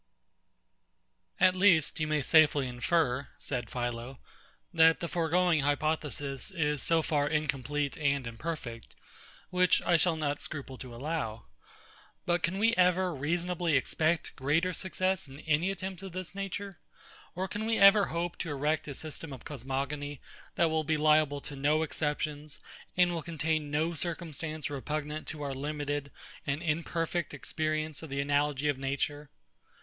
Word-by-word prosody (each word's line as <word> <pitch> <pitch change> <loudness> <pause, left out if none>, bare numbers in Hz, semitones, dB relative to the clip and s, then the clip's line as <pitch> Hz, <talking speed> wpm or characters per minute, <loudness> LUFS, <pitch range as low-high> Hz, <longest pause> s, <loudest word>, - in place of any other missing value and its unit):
At 185 - +6
least, 185 -5 +4
you 155 - 0
may 150 -2 +1
safely 150 -4 +5
infer, 130 +1 +1
said 125 -5 -4
PHILO, 120 +1 -4 0.6
that 165 -1 +6
the 170 - -3
foregoing 170 0 +2
hypothesis 145 -1 -1
is 150 -6 0
so 165 -1 +2
far 145 -2 +1
incomplete 145 -1 -1
and 140 -3 +1
imperfect, 115 -1 -6 0.6
which 180 -1 +4
I 175 - +4
shall 170 0 +2
not 145 -2 -2
scruple 135 -3 -6
to 125 -2 -8
allow. 125 -5 -3 0.8
But 175 0 +2
can 180 +3 0
we 225 +3 +3
ever 180 0 +3
reasonably 170 +2 0
expect 160 +4 0
greater 155 +7 +1
success 185 -1 -1
in 135 +2 -11
any 160 +4 +1
attempts 190 -1 -4
of 190 -3 -8
this 185 0 -5
nature? 195 -2 -5 0.6
Or 185 +2 -2
can 210 +3 -3
we 225 0 +2
ever 200 +1 +8
hope 170 +1 -3
to 165 - -3
erect 150 +2 0
a 140 - -4
system 155 +1 -6
of 130 -3 -9
cosmogony, 140 +1 -3 0.4
that 170 -2 +3
will 160 0 +1
be 155 +1 +1
liable 150 -1 +3
to 145 - -7
no 150 +3 +2
exceptions, 150 -1 -3 0.4
and 180 -1 +4
will 165 - -2
contain 155 -1 -1
no 155 +3 0
circumstance 160 -2 -3
repugnant 150 +2 -4
to 150 -2 -5
our 140 -1 -2
limited 145 +1 -3 0.4
and 140 +4 -1
imperfect 165 +1 -1
experience 155 -1 -2
of 160 - -8
the 140 0 -3
analogy 145 0 +1
of 145 -3 0
Nature? 140 +2 -2
155 Hz, 150 wpm, -30 LUFS, 145-170 Hz, 0.8 s, ever